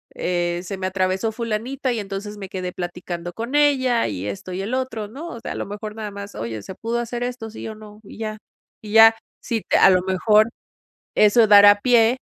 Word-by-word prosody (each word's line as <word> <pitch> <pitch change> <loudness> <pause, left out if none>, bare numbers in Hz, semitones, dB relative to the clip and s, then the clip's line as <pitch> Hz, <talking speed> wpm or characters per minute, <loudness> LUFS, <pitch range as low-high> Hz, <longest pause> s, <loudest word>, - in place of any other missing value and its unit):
eh, 175 -1 -1
se 190 +2 -6
me 185 0 -2
atravesó 190 +3 -1
fulanita 235 +4 -3
y 230 - -2
entonces 205 +1 -6
me 195 -2 -8
quedé 185 -2 -4
platicando 175 -1 -6
con 230 +7 -6
ella", 260 -5 +3
y 100 -2 -4
esto 100 - -6
y 185 - -3
el 215 +5 -4
otro. 255 -5 -3
No, 285 +11 -8
o 235 - -8
sea, - - -6
a - - -9
lo - - -4
mejor 210 +1 -7
nada 215 -2 -6
más: 200 0 -9
"Oye, 110 -1 -5
¿se - - -8
pudo 230 +3 -3
hacer 240 0 -4
esto, 245 -2 -5
sí 225 - -8
o 220 - -7
no?", 215 0 -13
y 200 - -13
ya. 215 -1 -4 0.4
Y 210 -1 -8
ya. 225 0 +8 0.3
Si 230 -4 -2
te - - +1
a - - +7
lo 185 -1 +4
mejor 210 +4 +3 0.7
eso 220 +2 +5
dará 205 0 +8
pie 240 +1 +4
210 Hz, 220 wpm, -22 LUFS, 190-230 Hz, 0.7 s, ya